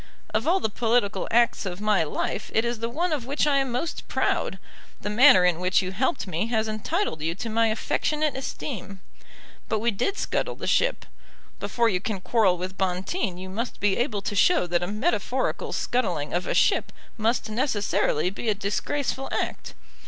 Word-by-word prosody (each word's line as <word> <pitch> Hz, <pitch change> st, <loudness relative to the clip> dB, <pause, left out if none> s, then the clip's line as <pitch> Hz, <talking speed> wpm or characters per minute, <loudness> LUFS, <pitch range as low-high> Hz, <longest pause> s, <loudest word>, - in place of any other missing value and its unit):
Of 220 Hz, +6 st, 0 dB
all 365 Hz, +3 st, +4 dB
the -, -, 0 dB
political 225 Hz, -1 st, 0 dB
acts 235 Hz, 0 st, +3 dB
of 185 Hz, -2 st, -5 dB
my 210 Hz, -3 st, +2 dB
life 160 Hz, +6 st, -3 dB
it 225 Hz, -, +3 dB
is 235 Hz, -1 st, -2 dB
the 230 Hz, +1 st, -2 dB
one 335 Hz, +6 st, 0 dB
of 260 Hz, -5 st, -3 dB
which 285 Hz, +3 st, +1 dB
I 290 Hz, -2 st, +3 dB
am 270 Hz, -2 st, -1 dB
most 250 Hz, +7 st, -3 dB
proud. -, -, 0 dB, 0.4 s
The 205 Hz, -, -3 dB
manner 215 Hz, -5 st, +7 dB
in 175 Hz, -2 st, +2 dB
which 185 Hz, +2 st, +2 dB
you 185 Hz, -, -3 dB
helped 260 Hz, -, 0 dB
me 185 Hz, +3 st, -2 dB
has 220 Hz, -2 st, 0 dB
entitled 215 Hz, -, -2 dB
you 165 Hz, +2 st, -1 dB
to 225 Hz, +4 st, -5 dB
my 225 Hz, +1 st, +3 dB
affectionate 300 Hz, +7 st, 0 dB
esteem. 220 Hz, -7 st, -5 dB, 0.7 s
But 220 Hz, -, +1 dB
we 235 Hz, +3 st, +1 dB
did 395 Hz, -, -1 dB
scuttle -, -, -1 dB
the -, -, -7 dB
ship. -, -, +1 dB, 0.5 s
Before 235 Hz, -1 st, +1 dB
you 190 Hz, -5 st, +1 dB
can 205 Hz, 0 st, -3 dB
quarrel 195 Hz, -2 st, +2 dB
with 185 Hz, +2 st, -6 dB
Bonteen 190 Hz, -, -1 dB
you 185 Hz, +1 st, -7 dB
must 225 Hz, +6 st, -4 dB
be 200 Hz, -1 st, +2 dB
able 225 Hz, -5 st, -1 dB
to 205 Hz, -, -3 dB
show 345 Hz, -, +4 dB
that 175 Hz, 0 st, 0 dB
a 175 Hz, -, -2 dB
metaphorical 215 Hz, -, -1 dB
scuttling 245 Hz, -, -1 dB
of 175 Hz, +1 st, -1 dB
a -, -, 0 dB
ship -, -, +3 dB, 0.2 s
must 225 Hz, 0 st, 0 dB
necessarily 210 Hz, -, +1 dB
be 220 Hz, +3 st, -3 dB
a 210 Hz, -, +2 dB
disgraceful 265 Hz, +7 st, -2 dB
act. -, -, -3 dB
220 Hz, 190 wpm, -25 LUFS, 190-250 Hz, 0.7 s, manner